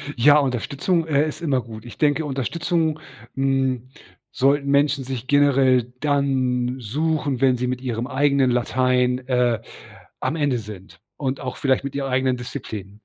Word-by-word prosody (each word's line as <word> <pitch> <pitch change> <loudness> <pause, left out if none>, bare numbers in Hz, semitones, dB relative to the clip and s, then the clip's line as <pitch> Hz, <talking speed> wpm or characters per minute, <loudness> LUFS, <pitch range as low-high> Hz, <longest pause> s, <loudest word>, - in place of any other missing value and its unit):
Ja, 145 +5 +6
Unterstützung, 145 +6 0
äh, 150 0 +2
ist 155 - -6
immer 140 -6 +1
gut. 110 -1 -10
Ich 120 - -11
denke, 150 +1 +2
Unterstützung, 160 +4 -1 0.4
hm, 135 -2 0 0.4
sollten 140 +2 +1
Menschen 140 0 +2
sich 130 -1 -5
generell 130 -3 +3
dann 130 -4 0
suchen, 140 +2 -1
wenn 130 -2 +4
sie 125 - -2
mit 125 0 -3
ihrem 120 -1 -3
eigenen 140 -1 +2
Latein, 125 +1 +1
äh, 125 -3 +2 0.6
am 160 - -1
Ende 145 -6 0
sind 95 -5 -11 0.2
und 135 -1 -2
auch 130 -2 -5
vielleicht 135 -1 +1
mit 140 0 -5
ihrer 135 -1 -2
eigenen 130 0 +1
Disziplin 105 -5 -7
130 Hz, 150 wpm, -22 LUFS, 125-145 Hz, 0.6 s, Ja